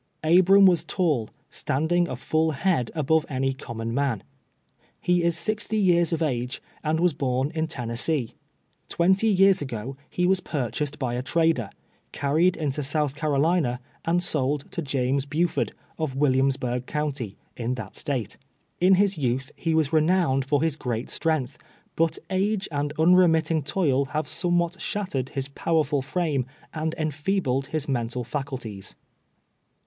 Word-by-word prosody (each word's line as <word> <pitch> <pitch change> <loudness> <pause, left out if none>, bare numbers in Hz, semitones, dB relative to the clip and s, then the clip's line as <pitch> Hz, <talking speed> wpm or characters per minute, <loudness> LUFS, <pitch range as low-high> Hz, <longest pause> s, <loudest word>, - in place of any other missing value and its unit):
Abram 185 +4 +6
was 180 -3 +5
tall, 150 - 0 0.2
standing 170 +5 0
a 130 - -4
full 155 +5 0
head 155 -4 0
above 155 +1 +2
any 135 -1 0
common 115 -3 -5
man. 130 -6 0 0.8
He 180 0 +2
is 170 -1 +2
sixty 215 +4 -2
years 175 -4 +3
of 165 -1 0
age, 125 -3 -1 0.2
and 155 +1 +1
was 175 -1 +3
born 135 0 -1
in 160 -1 -1
Tennessee. 120 +1 -2 0.6
Twenty 190 +5 +3
yeare 195 -1 +6
ago, 130 -1 -5
he 180 - 0
was 190 +1 +3
pur 130 - -3
chased 150 +5 -3
by 125 -4 -2
a 125 - -1
trader, 160 - +1 0.4
carried 160 +6 +2
into 150 -2 -1
South 145 0 0
Carolina, 150 -3 +1 0.2
and 175 +2 +1
sold 145 -2 -1
to - - -3
James 135 -1 0
Buford, 160 +4 0 0.3
of 155 -5 -2
Williamsburgh 130 -3 +1
county, 140 -9 -3 0.2
in 120 +1 -2
that 110 -5 -8
State. 125 -8 -3 0.4
In 185 +2 +6
his 195 -2 +2
youth 130 0 -1
he 165 -2 -1
was 160 -1 +1
renowned 155 -4 +3
for 145 +1 +1
his 160 -3 +1
great 120 -4 -3
strength, 155 -6 0 0.4
but 165 0 +1
age 195 +1 0
and 145 0 -1
unremitting 165 -2 +4
toil 140 -2 +1
have 155 +3 -3
somewhat 175 0 0
shattered 145 -11 -2
his 135 -1 -1
powerful 150 -1 0
frame 140 -3 -1 0.3
and 160 0 -2
enfeebled 150 -3 -1
his 155 0 -3
mental 125 -2 -1
faculties. 120 -6 -5
150 Hz, 145 wpm, -25 LUFS, 130-170 Hz, 0.8 s, Abram